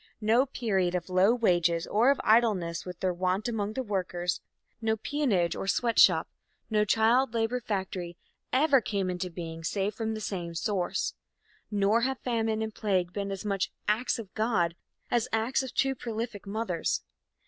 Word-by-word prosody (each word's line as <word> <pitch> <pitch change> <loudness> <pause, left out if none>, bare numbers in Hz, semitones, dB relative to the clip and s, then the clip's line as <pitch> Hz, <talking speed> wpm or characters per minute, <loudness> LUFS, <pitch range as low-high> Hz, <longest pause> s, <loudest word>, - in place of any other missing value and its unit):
No 230 +5 +3
period 195 -9 0
of 180 0 -3
low 185 +3 +4
wages 175 -7 +2
or 225 +5 +3
of 280 - +3
idleness 205 -7 +2
with 180 -2 -8
their 185 -1 +1
want 185 +5 0
among 215 -3 -2
the 260 - -2
workers, 180 -4 -2 0.4
no 220 0 +1
peonage 220 - 0
or - - -4
sweatshop, 195 -7 +4 0.4
no 210 -1 +3
child 230 +4 +3
labor 230 +2 +1
factory, 190 -6 -4 0.3
ever 275 0 +4
came 195 -4 -1
into 180 0 -3
being, 165 -1 -7
save 195 +5 -1
from 220 +1 -3
the - - -4
same 175 -5 -4
source. 190 -1 -1 0.6
Nor 205 +2 +2
have 265 +2 0
famine 225 -2 0
and 220 0 -4
plague 185 -5 0
been 200 -1 -3
as 195 +1 -5
much 195 -2 -1 0.2
"acts 220 +4 +1
of 215 -4 -9
God" 195 -7 +1 0.4
as 240 0 +2
acts 225 +4 +1
of 260 -2 -5
too 270 0 +1
prolific 225 -4 -5
mothers. 200 -5 -1
210 Hz, 165 wpm, -29 LUFS, 180-230 Hz, 0.6 s, low